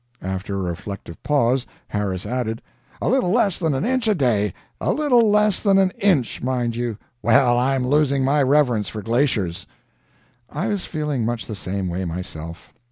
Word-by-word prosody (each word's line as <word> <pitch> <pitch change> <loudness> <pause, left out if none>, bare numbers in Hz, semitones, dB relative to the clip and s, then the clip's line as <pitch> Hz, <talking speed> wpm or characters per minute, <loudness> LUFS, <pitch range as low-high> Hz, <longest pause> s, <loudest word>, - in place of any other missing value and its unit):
After 95 +2 -3
a 100 - -2
reflective 90 -1 -8
pause, 130 -3 +1 0.2
Harris 100 -3 -2
added, 115 -1 -3 0.4
"A - - 0
little 250 -3 +2
less 205 -3 +2
than 160 -5 0
an 135 - -1
inch 255 -1 0
a 215 - +3
day; 110 - +1 0.3
a - - 0
little 250 -7 +3
less 210 -1 +3
than 200 -2 +3
an 190 -1 +3
INCH, 175 - +1
mind 125 -2 -1
you. 120 -3 -2 0.2
Well, 120 +2 +4
I'm 130 0 +1
losing 140 -1 +2
my 145 +2 +3
reverence 130 -7 +2
for 105 -2 -6
glaciers." 115 -7 0 0.8
I 155 +7 -3
was 205 -3 -2
feeling 150 -6 -2
much 115 0 -2
the 110 - -6
same 95 +1 -3
way 90 +2 -3
myself. 85 -1 -7
125 Hz, 170 wpm, -22 LUFS, 105-155 Hz, 0.8 s, Well